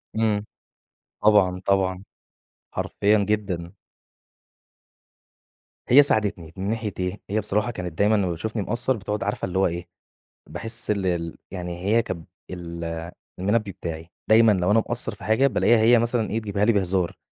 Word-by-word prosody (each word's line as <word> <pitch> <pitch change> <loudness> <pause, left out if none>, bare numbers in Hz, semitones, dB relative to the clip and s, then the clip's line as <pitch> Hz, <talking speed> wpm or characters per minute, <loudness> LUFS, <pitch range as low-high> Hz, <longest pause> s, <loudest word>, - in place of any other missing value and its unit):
امم 110 -2 +1 0.8
طبعًا 95 -4 +4
طبعًا، 95 -1 +1 0.7
حرفيًا 105 +1 +1
جدًا. 95 -5 -2 2.2
هي 135 +4 +9
ساعدتني 100 - 0
من 95 +2 -3
ناحية 110 -2 -2
إيه، 90 +2 -3
هي 105 +2 +1
بصراحة 105 +3 0
كانت 90 -6 -6
دايمًا 105 +2 +3
لمّا 95 -4 +1
بتشوفني 110 +6 -3
مقصّر 120 +5 0
بتقعد 105 0 -3
عارفة 105 - -2
اللي 90 0 -3
هو 95 - +4
إيه، 85 0 -5 0.6
باحِس 115 +8 -2
ال 100 -2 -1
ال 85 -2 -2
يعني 90 -2 -5
هي 115 +3 +4
كانت 85 -7 -6 0.2
ال 85 -2 -6 0.6
المنبه 105 +2 0
بتاعي، 80 -2 -7 0.2
دايمًا 110 0 +6
لو 90 -1 +1
أنا 110 - +5
مقصّر 120 +2 -2
في - - -14
حاجة 110 +6 +3
بالاقيها 120 -3 +3
هي 115 +2 +6
مثلًا 120 -1 0
إيه 110 - -1
بتجيبها 105 -2 -1
لي 115 - +4
بهزار، 95 -3 0
100 Hz, 150 wpm, -24 LUFS, 90-110 Hz, 2.2 s, هي